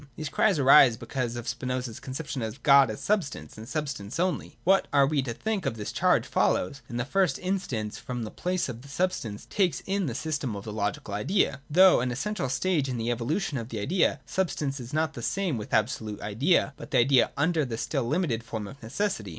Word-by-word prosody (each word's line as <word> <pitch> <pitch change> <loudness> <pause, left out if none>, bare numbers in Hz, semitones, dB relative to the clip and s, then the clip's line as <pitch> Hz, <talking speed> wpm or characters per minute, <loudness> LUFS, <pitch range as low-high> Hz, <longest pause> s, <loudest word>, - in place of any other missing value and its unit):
These 155 -2 -4
cries - - +2
arise 135 -3 +7
because 120 0 -3
of 120 -1 -6
Spinoza's 125 -1 -3
conception 135 0 -5
of 110 +4 -5
God 140 -3 +7
as 110 - -5
substance, 200 -9 -1
and 110 +1 -10
substance 140 -6 -4
only. 180 0 -1
What 195 +2 +4
we 140 +1 +3
are - - +4
to 120 - -3
think 215 - -2
of - - -1
this 105 - -4
charge - - +2
follows, 140 +9 0
in 120 - -4
the 120 - -1
first 180 -2 +1
in 190 +1 -1
stance, 110 - -4
from 125 -2 -5
the 110 - -6
place 180 0 -1
which 125 0 -7
substance 140 - -2
takes 185 -4 +1
in 195 -2 0
the 120 - -2
sys 155 +4 -2
tem 125 -7 -3
of 100 - -6
the 105 - -6
logical 105 -1 -3
idea. 135 - +1
Though 185 +4 +6
an 125 - 0
essential 155 - -2
stage 150 -1 0
in 125 - -2
the 115 +1 -1
evolution 140 - -1
of 115 0 -7
the 115 - -5
idea, 155 - +1
substance 145 -2 -2
is 120 0 -8
not 155 +1 0
the 120 - -7
same 175 - -1
with 105 - -7
abso 110 +2 +1
lute 105 -2 -6
Idea, 140 - +1
but - - -9
the - - +1
idea 125 +1 +5
under 160 +2 +2
the 120 -4 -4
still 135 0 -1
limited 140 -5 0
form 110 -2 -5
of 135 +7 -11
neces 140 - -2
sity. 100 - -8
135 Hz, 225 wpm, -27 LUFS, 115-165 Hz, -, arise